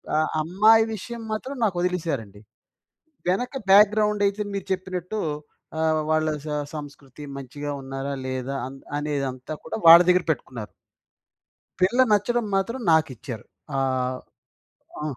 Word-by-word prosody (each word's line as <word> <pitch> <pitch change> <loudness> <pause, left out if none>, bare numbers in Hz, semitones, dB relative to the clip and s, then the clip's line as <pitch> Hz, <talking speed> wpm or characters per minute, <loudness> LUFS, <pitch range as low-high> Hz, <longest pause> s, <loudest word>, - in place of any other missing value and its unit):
అ - - +3 0.2
అమ్మాయి 215 +7 +5
విషయం 235 +3 -6
మాత్రం 255 +6 -4
నాకు 200 -5 +1
వదిలేసారండి. 155 - -2 0.9
వెనక 245 +9 0 0.2
బ్యాక్‌గ్రౌండ్ 210 +1 +5
అయితే 200 +1 -1
మీరు 195 -1 -4
చెప్పినట్టు 185 +2 -4 0.6
ఆహ్, 160 -1 +2
వాళ్ళ 155 0 +2 0.2
సం 150 -1 -1
సంస్కృతి 145 -2 -9
మంచిగా 140 +2 -6
ఉన్నారా 135 +1 -5
లేదా 130 +1 -3
అన్ 135 +1 -8 0.2
అనేదంతా 140 -2 -3
కూడా - - -4
వాళ్ళ 165 +1 +11
దగ్గర 180 0 +5
పెట్టుకున్నారు. 120 -6 -4 1.1
పిల్ల 205 +8 +3
నచ్చడం 220 +3 +2
మాత్రం 210 +7 -1
నాకిచ్చారు. 130 -7 0 0.3
ఆ! - - +1 1.2
ఆ. - - -4
165 Hz, 120 wpm, -24 LUFS, 140-205 Hz, 1.2 s, వాళ్ళ